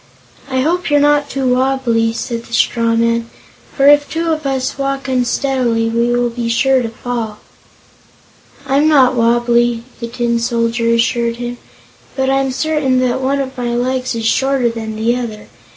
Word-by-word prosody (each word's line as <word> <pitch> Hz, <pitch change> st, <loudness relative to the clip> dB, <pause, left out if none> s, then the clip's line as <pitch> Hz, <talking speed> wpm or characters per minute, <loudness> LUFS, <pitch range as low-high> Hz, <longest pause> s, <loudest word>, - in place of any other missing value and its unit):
"I 260 Hz, -1 st, 0 dB
hope 345 Hz, +5 st, 0 dB
you're 290 Hz, 0 st, +4 dB
not 290 Hz, 0 st, +2 dB
wobbly," 255 Hz, -3 st, +1 dB
said 230 Hz, 0 st, -5 dB
the 235 Hz, -, -13 dB
straw 230 Hz, -1 st, +2 dB
man, 230 Hz, 0 st, 0 dB, 0.5 s
"for 275 Hz, -, +3 dB
if 290 Hz, 0 st, +5 dB
two 330 Hz, +1 st, -2 dB
of 310 Hz, -2 st, -2 dB
us 265 Hz, -1 st, -2 dB
walk 275 Hz, 0 st, -2 dB
unsteadily 250 Hz, -2 st, 0 dB
we 235 Hz, +1 st, +1 dB
will 240 Hz, 0 st, +1 dB
be 230 Hz, 0 st, -3 dB
sure 260 Hz, +3 st, +2 dB
to 230 Hz, -, -3 dB
fall." 225 Hz, -2 st, -5 dB, 1.3 s
"I'm 280 Hz, +3 st, +2 dB
not 270 Hz, -5 st, +5 dB
wobbly," 240 Hz, 0 st, +2 dB, 0.2 s
the 235 Hz, -, -4 dB
Tin 235 Hz, 0 st, -1 dB
Soldier 230 Hz, 0 st, 0 dB
assured 235 Hz, 0 st, +1 dB
him, 240 Hz, 0 st, -6 dB, 0.6 s
"but 265 Hz, 0 st, 0 dB
I'm 270 Hz, 0 st, +1 dB
certain 280 Hz, -1 st, 0 dB
that 255 Hz, +1 st, 0 dB
one 275 Hz, +2 st, 0 dB
of 265 Hz, -1 st, -4 dB
my 240 Hz, -2 st, -2 dB
legs 255 Hz, 0 st, -1 dB
is 225 Hz, -1 st, -3 dB
shorter 265 Hz, +1 st, +1 dB
than 220 Hz, -1 st, -6 dB
the 225 Hz, +2 st, 0 dB
other. 225 Hz, -4 st, -6 dB
245 Hz, 165 wpm, -16 LUFS, 230-270 Hz, 1.3 s, if